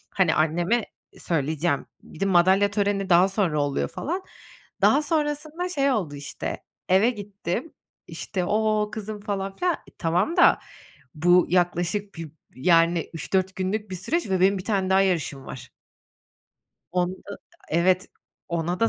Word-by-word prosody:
Hani, 180 -5 +3
anneme 175 +9 +1 0.3
söyleyeceğim, 155 -1 -1 0.2
bir - - -14
de 195 - +1
madalya 190 +2 +4
töreni 200 -2 0
daha 180 +2 +5
sonra 185 -7 0
oluyor 145 -1 -1
falan. 365 +5 -4 0.6
Daha 285 - +5
sonrasında 305 +2 -2
şey 280 -5 +1
oldu 180 - -1
işte, 145 0 -6 0.3
eve 195 +6 +5
gittim, 205 - -5 0.3
işte, 185 -4 -4
ooo, 215 +1 +1
kızım 215 0 -6
falan 195 -2 -3
filan 355 - +1 0.2
tamam 180 - 0
da, 350 - +6 0.6
bu 175 +3 +4
yaklaşık 180 +3 0
bir, 165 -3 -7 0.2
yani, 165 +3 +3
3-4 185 +3 -1
günlük 195 +2 -2
bir - - -3
süreç 285 - -2
ve 190 -1 +1
benim 195 +1 +4
bir 185 - -7
tane 195 -3 0
daha 190 0 +5
yarışım 165 -8 -1
var. 120 -2 -9 1.2
Onu 180 0 0
da 200 - -10 0.3
evet 180 +3 +2 0.4
...ona 170 +1 -2
da 230 - +4
190 Hz, 145 wpm, -25 LUFS, 170-210 Hz, 1.2 s, da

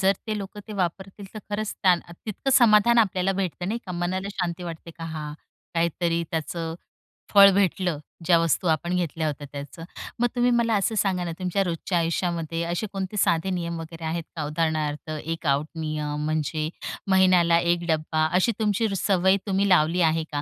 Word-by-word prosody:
जर 195 0 +4
ते 215 -1 -2
लोक 200 +1 -7
ते - - -6
वापरतील, 190 +1 -3
तर - - -5
खरंच 210 +1 -2
त्या 185 -3 +6 0.3
तितकं 220 +5 -2
समाधान 235 0 +5
आपल्याला 195 -3 +2
भेटतं 185 -1 -3
नाही 230 +3 -1
का? 180 - -5
मनाला 185 +3 -2
शांती 180 -1 -3
वाटते 170 -1 -7
का, 165 0 -9
हां, 155 -2 -5 0.4
काहीतरी 170 0 0
त्याचं 165 +1 -3 0.6
फळ 200 -1 +9
भेटलं. 185 -4 +1 0.3
ज्या 170 0 +5
वस्तू 165 +2 +1
आपण 170 +3 +1
घेतल्या 165 -3 -1
होत्या 145 -1 -4
त्याचं, 145 +3 -8 0.4
मग 240 - +3
तुम्ही 245 0 +3
मला 235 -1 +2
असं 210 +3 0
सांगा 185 -3 +1
ना, 170 - -3
तुमच्या 185 +2 0
रोजच्या 175 0 -2
आयुष्यामध्ये 165 -1 -1
असे 175 +5 -2
कोणते 195 +2 -4
साधे 170 -1 +2
नियम 170 -2 -3
वगैरे 165 0 -9
आहेत 165 +1 -2
का? 155 - -3
उदाहरणार्थ 155 -1 -1
एक 165 +1 -5
आउट 140 +2 +2
नियम 150 -1 -3
म्हणजे 155 0 -1 0.4
महिन्याला 180 -3 +5
1 170 0 0
डब्बा 155 0 +1
अशी 190 +6 +3
तुमची 220 +1 +1
सवय 190 0 +3
तुम्ही 195 +1 +1
लावली 175 0 +4
आहे 160 -1 +2
का? 145 0 -2
175 Hz, 175 wpm, -25 LUFS, 160-195 Hz, 0.6 s, फळ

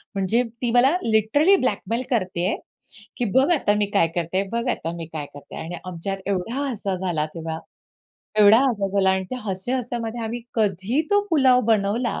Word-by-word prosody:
म्हणजे 195 +6 +1 0.2
ती 240 -2 0
मला 260 +7 +4
लिटरली 230 - +4
ब्लॅकमेल 225 +1 -1
करत 185 -8 -1
आहे 180 +4 +1 0.6
की 245 - 0
"बघ, 270 +5 +5
आता 265 -10 +2
मी 205 - +2
काय 180 -5 +4
करते 175 +3 0
बघ 235 +2 -2
आता 165 -7 -2
मी 165 -1 -6
काय 150 -2 -4
करते?" 145 - -11
आणि 165 +2 -5
आमच्यात 185 +2 -4
एवढा 200 +5 -2
हसा 200 -5 -3
झाला 175 -5 -1
तेव्हा, 160 -1 -4 0.8
एवढा 210 +2 +8
हसा 205 -5 -1
झाला 190 -1 +2
आणि 190 0 0
त्या 255 - -3
हस्या-हस्यामध्ये 235 +3 -3
आम्ही 235 +2 -4
कधी 210 - +1
तो 410 0 +5
पुलाव 260 -5 +5
बनवला, 220 +3 +1
205 Hz, 170 wpm, -23 LUFS, 185-240 Hz, 0.8 s, एवढा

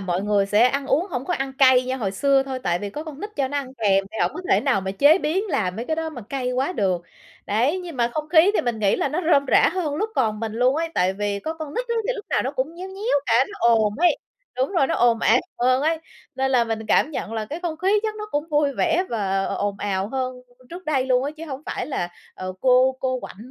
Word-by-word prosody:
mọi 185 -1 -2
người 205 -1 +2
sẽ 210 +3 +3
ăn 275 +1 -2
uống 335 +8 +1
hổng 255 0 -3
có 360 - -1
ăn 270 0 -3
cay 260 -1 +5
như 260 +1 -2
hồi 205 -6 -2
xưa 275 +6 +2
thôi, 265 -1 -5
tại 175 0 0
vì 205 +1 -5
có 300 +7 -6
con 305 -2 -9
nít 420 - -5
cho 270 -2 0
nó 290 - -3
ăn 265 -1 -7
kèm 195 -4 +2
thì 220 - -6
hổng - - +2
có 365 - -5
thể - - +5
nào 260 -8 +1
mà 190 0 -3
chế 285 - +5
biến 360 +7 0
làm 185 - -1
mấy 230 - -4
cái 315 +3 -2
đó 320 0 -2
mà 245 -6 -8
cay 255 -2 -2
quá 265 +7 0
được. 185 - 0 0.4
Đấy, 250 - +1
nhưng 345 -6 -8
mà 235 -1 +2
không 305 0 -3
khí 340 +3 +6
thì - - +3
mình 240 -3 -2
nghĩ 200 -2 +2
là - - 0
nó 320 +6 -2
rôm 280 0 +4
rả - - +5
hơn 335 -6 -2
lúc 435 +5 -2
còn 215 -4 0
mình 220 -1 -3
luôn 250 +5 +2
ấy, 330 0 -1
tại 185 +1 +2
vì 200 0 -2
có 320 +1 -4
con 315 -2 -7
nít - - -3
á, 470 - 0
thì - - +3
lúc 425 -3 -7
nào 300 - +1
nó 265 - -2
cũng 285 +4 -3
nhéo 370 +2 -7
nhéo 385 - 0
cả, 235 +3 +4
nó 415 - -10
ồn 220 -3 +3
ấy, 350 0 +3 0.4
đúng 260 +8 0
rồi, 335 -8 +3
nó - - -1
ồn 235 -1 +3
ào 240 +3 +4 0.2
hơn 255 +2 +2
ấy. 320 +1 +1 0.4
Nên 265 0 0
là 250 -3 +3
mình 220 -1 -4
cảm 300 - +3
nhận 225 - -5
là 220 -1 -2
cái 310 +10 -6
không 335 -3 -3
khí 390 +5 +2
chắc 435 -1 -2
nó 425 0 -6
cũng 295 +3 -2
vui 295 -2 +2
vẻ 340 +5 +1
và 195 -4 -1
ồn 205 -1 -2
ào 195 -1 -2
hơn 255 0 -2 0.4
trước 355 +1 -9
đây 270 -4 0
luôn 255 0 +2
á, 290 - -2
chứ 325 - -7
hổng 275 0 -6
phải - - -3
là, 220 -11 -2 0.3
ờ, 185 0 -5
cô 260 0 +4
cô 255 -1 -1
quạnh - - -9
265 Hz, 280 wpm, -23 LUFS, 220-315 Hz, 0.4 s, khí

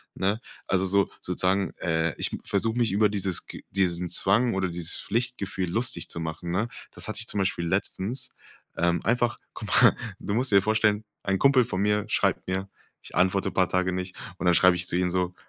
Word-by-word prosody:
ne? 100 +4 0 0.3
Also, 95 0 +1
so, 100 +1 +2
sozusagen 95 +2 0
äh, 80 -2 0
ich - - -1
versuch 110 +3 0
mich 120 -3 +1
über 105 +1 +4
dieses 95 -3 -1
g - - -10
diesen 90 -2 0
Zwang 100 +7 +3
oder 95 -1 0
dieses 85 -1 -1
Pflichtgefühl 110 -6 -2
lustig 100 -3 0
zu - - -4
machen, 80 +2 -5
ne? 105 +6 0 0.2
Das - - -7
hatte 110 - -3
ich 115 - -3
zum 105 - -1
Beispiel 95 -3 0
letztens, 100 +6 -2 0.5
ähm, 85 0 +1
einfach 120 +1 +1 0.2
guck - - -7
mal - - +5 0.2
du 100 - -3
musst 125 +2 +1
dir 100 - +7
vorstellen, 105 0 +2 0.2
ein 95 -1 0
Kumpel 135 -3 +5
von 100 -5 -2
mir 105 0 +1
schreibt - - 0
mir, 95 +1 -2 0.3
ich - - -12
antworte 95 +2 +2
paar 95 -1 +2
Tage 95 0 +1
nicht. 90 0 -4 0.2
Und - - -4
dann 90 - +5
schreib 90 +1 +6
ich 90 +1 -1
zu 90 - -1
ihm 90 0 +1
so: 90 0 -1
95 Hz, 200 wpm, -26 LUFS, 90-105 Hz, 0.5 s, dir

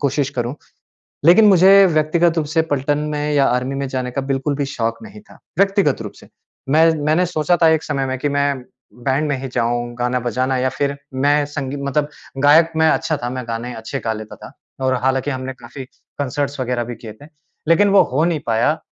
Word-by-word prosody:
कोशिश 140 0 0
करूँ। 120 0 -3 0.7
लेकिन 180 +7 +7
मुझे 195 +1 +7
व्यक्तिगत 165 +1 +1
रूप 155 - +1
से 160 +1 +1
पलटन 145 +1 0 0.2
में 150 0 -2
या 140 -2 +3
आर्मी 125 +2 0
में 140 0 -3
जाने 130 -1 -3
का 140 - -2
बिल्कुल 135 +1 -2
भी 145 - -2
शौक 115 -4 -3
नहीं 215 -1 -12
था, 215 - -19 0.2
व्यक्तिगत 195 - +2
रूप 105 - -6
से। - - -16 0.4
मैं 160 +3 +5 0.2
मैंने 160 +4 +2
सोचा 175 0 0
था 165 - +7
एक 160 -1 +2
समय 135 -2 -2
में 130 0 -3
कि 145 - -1
मैं 140 -2 0 0.3
बैंड 135 +5 -1
में 140 - 0
ही 135 - -4
जाऊँ, 120 +1 -1
गाना 125 +1 0
बजाना 130 +2 -1
या 130 +1 +1
फिर 140 0 0 0.2
मैं 145 +2 +2
संगी 145 -1 -5
मतलब 145 +1 -1 0.3
गायक 160 +3 +5
में 160 0 +4
अच्छा 155 -1 0
था, 120 -1 -4
मैं 130 0 -5
गाने 120 +2 -4
अच्छे 110 0 -5
गा 110 - 0
लेता 110 0 -9
था। - - -13 0.3
और 130 - +2
हालाँकि 135 +2 0
हमने 130 0 -5
काफ़ी 125 +2 -10 0.3
कॉन्सर्ट 140 +1 -2
वगैरह 125 -1 -1
भी 120 - -6
किए 110 -1 -10
थे, 145 - -12 0.4
लेकिन 200 +5 +4
वो 195 -2 +6
हो 150 +4 +2
नहीं 170 -3 0
पाया। 115 +7 +1
140 Hz, 210 wpm, -19 LUFS, 125-155 Hz, 0.7 s, लेकिन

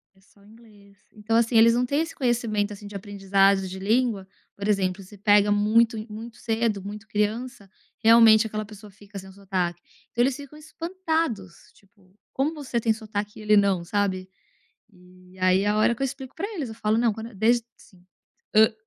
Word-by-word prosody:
É 190 - -26
só 200 +1 -26
inglês. 210 -2 -19 0.2
Então 215 +1 -3
assim, 230 0 +3
eles 230 +1 +7
não 245 +1 +1
têm 280 +4 0
esse 330 0 -4
conhecimento 230 -5 0
assim 205 0 -10
de 205 0 -10
aprendizagem 195 -1 +1
de 190 +1 -7
língua, 215 -1 0 0.3
por 200 0 -5
exemplo, 195 -2 0
se 195 +2 -14
pega 205 0 +4
muito 220 +3 +3
e 215 - -6
muito 225 +2 -9
cedo, 225 -3 -1
muito 210 +2 -8
criança, 215 +2 -2 0.3
realmente 225 -1 +6
aquela 215 -1 -4
pessoa 210 0 -13
fica 200 +1 -13
sem 190 0 -10
sotaque. 185 -3 -3 0.3
Então 235 - 0
eles 260 +1 +1
ficam 285 +1 -11
espantados, 320 - -4
tipo, 195 -2 -27 0.2
como 280 +4 -1
você 275 -6 -3
tem 225 -1 +1
sotaque 210 -1 -6
e - - -9
ele 210 0 +4
não, 195 -3 +2
sabe? 190 0 -2 0.6
E 185 0 -20
aí 185 +1 +3
é 205 - -1
a 210 +1 +1
hora 215 +2 +3
que 235 - -10
eu - - +2
explico 265 -1 -7
pra 400 - -3
eles, 285 -9 -4
eu 220 - -9
falo: 215 0 0
"Não 230 -2 +2
quando 225 +2 -8
desde 235 +4 +2
assim, 185 -4 -21 0.5
hã, 220 +1 +6
210 Hz, 195 wpm, -25 LUFS, 200-235 Hz, 0.6 s, eles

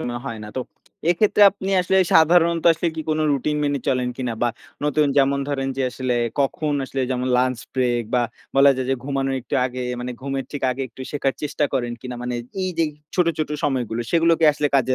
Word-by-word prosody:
সময় 120 0 -3
হয় 115 -4 -4
না। - - -8
তো - - 0 0.5
এক্ষেত্রে 205 +3 +3
আপনি 195 -1 -6
আসলে 185 +2 +1 0.2
সাধারণত 165 +1 +4
আসলে 165 - -2
কি 160 - -4
কোন 155 - 0
রুটিন 145 +2 0
মেনে 145 -1 0
চলেন 125 -1 +1
কিনা? 125 -3 -2
বা 120 - +3 0.4
নতুন 150 0 +2
যেমন 140 0 +3
ধরেন 135 -2 -1
যে 135 - 0
আসলে 125 +1 -2 0.3
কখন 145 +2 0
আসলে 135 +1 -4
যেমন 125 0 -1
লাঞ্চ 130 -1 +1 0.2
ব্রেক 120 -2 +1
বা 125 - +3 0.3
বলা 140 +1 +7
যায় 130 -1 -2
যে - - +3
ঘুমানোর 135 -1 -1
একটু 130 - -5
আগে, 130 0 -4 0.2
মানে 125 +1 -4
ঘুমের 135 0 -3
ঠিক 145 - -5
আগে 130 +2 -3
একটু 120 - -16
শেখার 140 -2 -1
চেষ্টা 150 0 0
করেন 120 -3 -1
কিনা? 125 +1 -6
মানে 125 0 -3 0.3
এইযে 175 -3 0 0.3
ছোট, 180 -2 +3
ছোট, 155 - -1 0.2
সময়গুলো 125 -5 -1
সেগুলো 165 0 +4
কি 165 - +3
আসলে 145 0 0
কাজে 130 -1 +3
135 Hz, 205 wpm, -22 LUFS, 125-155 Hz, 0.5 s, বলা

